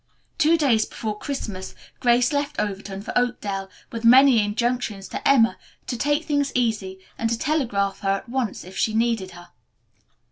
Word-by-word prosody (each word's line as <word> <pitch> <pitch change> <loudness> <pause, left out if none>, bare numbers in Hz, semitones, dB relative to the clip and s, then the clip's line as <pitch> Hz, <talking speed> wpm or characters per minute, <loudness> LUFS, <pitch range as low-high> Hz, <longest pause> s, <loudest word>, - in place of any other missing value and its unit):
Two 330 +1 +4
days 250 -8 +3
before 215 -2 -4
Christmas 210 -6 -5 0.2
Grace 245 +2 +3
left 290 +1 -1
Overton 200 -1 -4
for - - -6
Oakdale, 205 -6 -1 0.2
with 230 0 -6
many 250 -1 +7
injunctions 215 -2 -2
to - - -3
Emma 240 -4 +4 0.3
to 245 - -3
take 290 +5 0
things 285 -2 0
easy 215 -6 0 0.2
and 225 - 0
to 230 - 0
telegraph 230 -10 0
her 195 - -2
at 195 +4 -1
once 240 -4 -2
if 185 +2 -12
she 220 +2 0
needed 225 -4 +1
her. 175 0 -13
230 Hz, 165 wpm, -23 LUFS, 200-265 Hz, 0.3 s, many